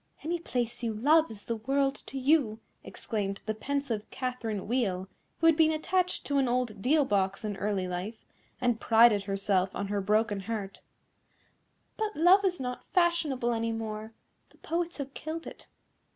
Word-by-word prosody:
"Any 340 +2 -1
place 240 -7 -2
you 225 -2 -2
love 310 +8 +4
is 210 -2 -7
the 230 - -2
world 270 +4 +1
to 275 - -6
you," 260 -5 +2 0.2
exclaimed 200 -3 -4
the 215 - -1
pensive 240 -2 -3
Catherine 240 -6 -4
Wheel, 200 -6 0 0.3
who 330 - -1
had 330 -1 +7
been 315 0 +4
attached 360 +4 0
to 285 -1 +1
an 265 - +2
old 240 -4 -1
deal 290 +5 +3
box 195 -2 0
in 210 -1 -2
early 195 -2 -1
life, 185 +5 -5 0.3
and 245 -3 +1
prided 225 -3 +5
herself 195 -1 +1
on 200 - -3
her 205 -1 0
broken 210 +1 +1
heart; 200 -1 -5 1.2
"but 430 -1 -2
love 360 +5 +6
is 365 -3 +1
not 250 -1 -4
fashionable 315 -9 +2
any 230 0 -1
more, 220 -1 -5 0.4
the - - -24
poets 340 +1 -3
have 280 -2 -6
killed 320 +1 -5
it. - - -10
235 Hz, 165 wpm, -29 LUFS, 210-290 Hz, 1.2 s, had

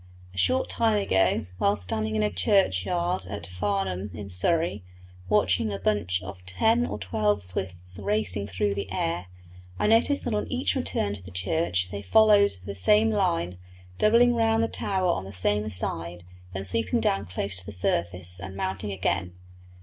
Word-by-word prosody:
A - - -14
short 260 - +2
time 220 -2 +2
ago, 95 - +2
while 100 - +3
standing 110 +4 -2
in 105 - +1
the 105 - +1
churchyard 175 - +1
at 100 0 -6
Farnham, 95 0 -2
in 100 +2 -7
Surrey, 110 - +1 0.5
watching 100 +6 +2
a 100 - -3
bunch 95 -2 0
of 95 -1 -9
ten 225 - +2
or - - -4
twelve 105 +1 0
swifts 90 0 -5
racing 100 -1 0
through 100 +1 -1
the 100 -1 -5
air, 85 -1 -2 0.5
I - - 0
noticed 230 +6 +3
that 240 - -2
on 210 - -1
each 255 +1 0
return 250 - -1
to 100 - -8
the 90 - -11
church 95 - -1
they 100 0 -5
followed 205 - +5
the 100 - -5
same 105 +4 +4
line, 90 -3 0 0.4
doubling 235 +3 +5
round 225 -1 +2
the - - +2
tower 190 -4 -1
on 95 - -2
the 95 - -8
same 105 +3 +1
side, 85 -2 -2 0.3
then 95 +1 -5
sweeping 110 +3 0
down 100 -2 0
close 95 +1 -2
to 90 - -10
the - - -5
surface, 90 -1 -1
and 95 +2 -7
mounting 95 +1 -3
again. 90 -2 -1
100 Hz, 175 wpm, -26 LUFS, 90-115 Hz, 0.5 s, followed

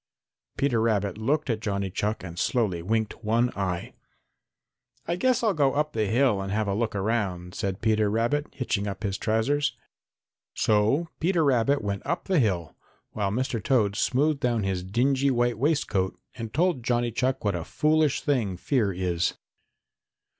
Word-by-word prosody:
Peter 125 -5 +1
Rabbit 105 -4 +1
looked 145 +7 0
at 115 -4 0
Johnny 100 -3 -2
Chuck 105 +3 -2
and 85 -2 -7
slowly 105 -9 0
winked 110 +4 -2
one 115 +3 +2
eye. 90 -3 -3 1.1
"I 170 - 0
guess 255 +5 +1
I'll 215 -3 +3
go 140 -5 +2
up 150 +1 0
the 110 -2 0
hill 115 -2 +2
and 95 0 -4
have 105 0 0
a 100 - 0
look 110 +1 -1
around," 95 -4 -1
said 95 -1 -3
Peter 110 -2 +2
Rabbit, 120 +8 0
hitching 105 -6 -2
up 100 +2 -5
his 100 -2 -2
trousers. 125 +7 0 0.8
So 110 +11 +2
Peter 170 0 +2
Rabbit 140 -1 +2
went 100 -1 -3
off 145 - -2
up - - -30
the 185 -4 +2
hill, 90 - 0 0.4
while 100 -2 -1
Mr. 115 0 -2
Toad 105 -7 +2
smoothed 140 +6 +1
down 120 -4 0
his 95 -2 -1
dingy 130 +8 +1
white 120 -3 +1
waistcoat 130 - 0
and 115 -3 -6
told 170 -2 +1
Johnny 120 0 +1
Chuck 130 0 -1
what 100 - +2
a 85 -2 -3
foolish 155 - +1
thing 115 -11 0
fear 110 0 +1
is. 90 -2 -1
115 Hz, 170 wpm, -26 LUFS, 100-135 Hz, 1.1 s, I'll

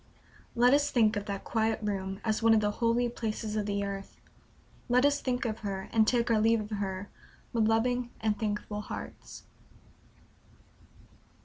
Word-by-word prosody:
Let 245 +2 +5
us 290 0 +3
think 225 -3 +3
of 205 0 -3
that 200 -1 -4
quiet 225 -1 0
room 195 -2 -3
as 220 -1 0
one 225 0 +5
of - - +5
the 210 -1 +1
holy 235 +1 +3
places 220 -2 -4
of 210 -1 -1
the 200 0 -1
earth; 195 0 -6 0.7
let 250 +2 +4
us 285 0 +2
think 250 0 -1
of 220 -1 -2
her, 195 -2 -4
and 220 -1 +4
take 235 -1 +2
our 220 -2 +3
leave 225 +1 +4
of 210 0 -6
her, 200 -1 -3 0.5
with 225 -2 +2
loving 245 +2 +1
and 210 -2 0
thankful 210 -1 -3
hearts. - - -8
220 Hz, 170 wpm, -30 LUFS, 205-235 Hz, 0.7 s, Let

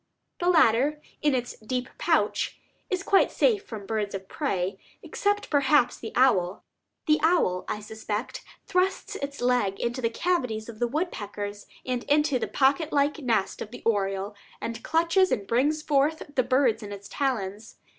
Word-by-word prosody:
The 350 - 0
latter, 295 -2 +4 0.2
in 295 -3 +3
its 245 -1 -3
deep 250 +3 -3
pouch, - - +1 0.3
is 375 -2 -1
quite 390 - +4
safe 435 -4 +2
from 215 - -8
birds 210 -1 -2
of 190 0 -7
prey, 195 - -2 0.2
except 410 0 -1
perhaps 285 -2 +4
the 225 - -6
owl. 205 -8 +3 0.4
The 305 -1 +4
owl, 315 - +2
I 210 - -3
suspect, 215 +1 -5 0.2
thrusts 385 +2 0
its 280 -4 -5
leg 245 -6 +1
into 240 +2 -2
the 230 - +1
cavities 240 -7 -1
of 230 -1 -10
woodpeckers 210 - -3 0.2
and 250 -2 -2
into 295 -2 +2
the - - -2
pocket 285 +4 +2
like 290 +2 +2
nest 230 -8 0
of - - -5
the 245 - -11
oriole, 195 -2 0 0.3
and 230 0 -5
clutches 335 +4 +3
and 200 - 0
brings 290 +8 +1
forth 300 +2 +2
the 260 - +3
birds 255 -2 +2
in 205 -1 -7
its 200 0 -8
talons. 220 -6 -3
250 Hz, 160 wpm, -26 LUFS, 215-300 Hz, 0.4 s, latter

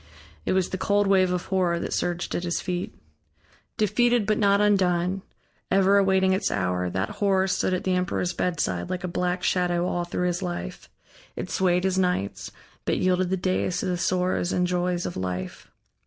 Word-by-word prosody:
It - - +2
was 185 -1 +1
the 190 - -4
cold 205 0 +2
wave 190 -2 +3
of 180 0 -2
Horror 180 -3 +1
that - - -4
surged 175 0 -2
at - - -1
his 175 -1 -1
feet. 180 -1 -4 0.8
Defeated, 240 +2 +2
but 215 0 +1
not 200 -1 +4
undone, 190 -2 +2 0.5
ever 195 +1 +4
awaiting 190 -1 +3
its 190 - 0
hour, 90 -1 -1
that 95 +2 -2
Horror 190 -1 +3
stood 185 - 0
at 180 - -4
the 185 - 0
emperor's 180 -1 -1
bedside, 150 - -1
like 180 -1 -3
a - - -1
black 180 +1 -1
shadow 175 -1 +1
all 175 -1 -1
through 180 +1 -2
his 175 +1 -1
life; 175 - -5 0.5
it - - -5
swayed 180 -1 +2
his 190 0 +1
nights, 180 - -1 0.3
but - - 0
yielded 185 0 +1
the 190 - 0
days 185 0 -1
to - - -3
the 180 - 0
sorrows 180 0 0
and 180 - +1
joys 180 0 -1
of - - -4
life. 90 0 -5
180 Hz, 185 wpm, -25 LUFS, 175-190 Hz, 0.8 s, not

